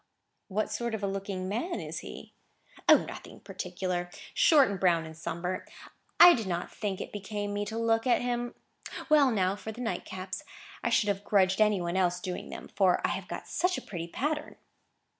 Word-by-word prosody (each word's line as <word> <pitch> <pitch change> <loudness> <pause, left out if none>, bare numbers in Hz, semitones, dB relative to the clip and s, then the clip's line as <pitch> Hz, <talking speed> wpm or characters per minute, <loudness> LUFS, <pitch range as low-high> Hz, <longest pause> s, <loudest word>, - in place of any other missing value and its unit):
"What 215 +2 -1
sort 235 -2 -2
of 210 - -6
a - - +1
looking 195 -1 -3
man 245 - -2
is - - -5
he?" - - -10 0.6
"O, - - +10
nothing - - -9
particular. 180 -2 -4 0.2
Short, 315 - +6
and 200 -2 -3
brown, 170 -3 +3
and 160 0 -9
sunburnt. 170 +3 -4 0.5
I 350 0 +11
did 225 - -2
not 175 -1 -3
think 200 -3 -3
it - - -6
became 205 0 -4
me 205 0 -1
to 220 +2 -5
look 225 +1 +1
at 245 - +4
him. 240 0 -2 0.5
Well, 295 -3 +6
now 195 -4 +1
for 220 +2 -7
the 220 - -11
nightcaps. 185 -5 -4 0.4
I - - +1
should 230 -3 +3
have 200 0 -1
grudged 190 -1 +3
any 210 -2 +4
one 175 +1 -2
else 180 -1 +2
doing 180 0 -5
them, - - -8
for 190 -3 +3
I - - +1
have - - -4
got - - -6
such 360 +1 0
a - - -5
pretty 170 -4 -5
pattern!" 295 - -2
200 Hz, 195 wpm, -29 LUFS, 185-230 Hz, 0.6 s, I